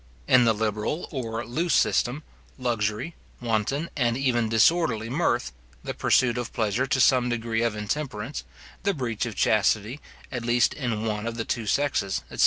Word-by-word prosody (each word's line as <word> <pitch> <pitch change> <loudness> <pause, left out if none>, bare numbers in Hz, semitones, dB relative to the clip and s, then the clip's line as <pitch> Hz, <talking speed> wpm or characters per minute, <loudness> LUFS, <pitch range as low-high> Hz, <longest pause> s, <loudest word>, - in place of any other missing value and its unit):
In 125 -2 +6
the 115 - +4
liberal 110 +8 -2
or 115 -5 -4
loose 160 +7 0
system, 135 +5 +1 0.3
luxury, 115 +3 -1 0.3
wanton, 120 +7 -1
and 120 -4 +1
even 120 -4 +1
disorderly 115 -1 +2
mirth, 125 - 0 0.3
the - - -4
pursuit 125 -2 +2
of 120 - -4
pleasure 115 +4 0
to 135 - +1
some 125 -1 +4
degree 115 -1 -1
of 115 -2 0
intemperance, 115 +3 -4 0.4
the 200 -1 0
breach 120 -4 -2
of 110 - -6
chastity, 110 +4 +2 0.3
at 125 -3 -4
least 120 0 +3
in 115 -6 -2
one 105 0 -2
of 115 - -3
the 115 - -2
two 115 -3 -2
sexes, 130 -7 0
etc. - - -9
120 Hz, 165 wpm, -26 LUFS, 110-130 Hz, 0.4 s, In